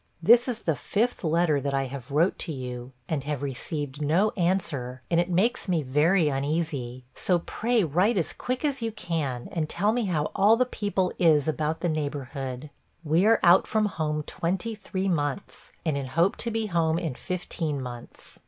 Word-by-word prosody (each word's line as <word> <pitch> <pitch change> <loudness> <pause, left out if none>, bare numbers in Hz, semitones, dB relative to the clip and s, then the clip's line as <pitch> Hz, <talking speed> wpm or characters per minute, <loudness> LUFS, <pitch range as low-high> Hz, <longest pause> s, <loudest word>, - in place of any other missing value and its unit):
This 235 +9 +6
is 240 -3 -4
the 160 - +1
fifth 220 - -1
letter 160 -3 +2
that 140 0 -1
I 135 - +1
have 130 -1 -8
wrote 160 +6 +2
to - - -3
you, 125 -2 -6 0.2
and 150 -4 -2
have 145 -2 -3
received 140 +1 -3
no 170 +9 +3
answer, 145 -9 -1
and 170 - +4
it 175 +1 +1
makes 210 +9 +1
me 170 -5 +1
very 155 +6 +3
uneasy. 140 -3 -2
So 180 - +1
pray 225 +6 0
write 180 +8 +2
as 170 - 0
quick 255 +3 -3
as 275 -3 -1
you 225 -1 -1
can, 160 - -3
and 155 -2 -2
tell 205 +4 +1
me 240 -2 0
how 155 -6 -1
all 210 +3 +5
the 255 - +3
people 200 -6 -1
is 155 -4 +4
about 155 +1 -1
the 175 - +1
neighborhood. 145 -3 -4 0.3
We 165 +6 +3
are 225 - +5
out 175 +2 +6
from 215 -1 +1
home 155 -5 -2
twenty 190 +9 -2
three 195 -2 -3
months, 150 0 -2
and 155 -3 +1
in 140 -2 -3
hope 165 +8 +2
to 235 - -2
be 225 -1 -1
home 165 -4 +1
in 165 -5 -2
fifteen 165 -2 -3
months. 120 -2 -9
165 Hz, 190 wpm, -26 LUFS, 145-195 Hz, 0.3 s, This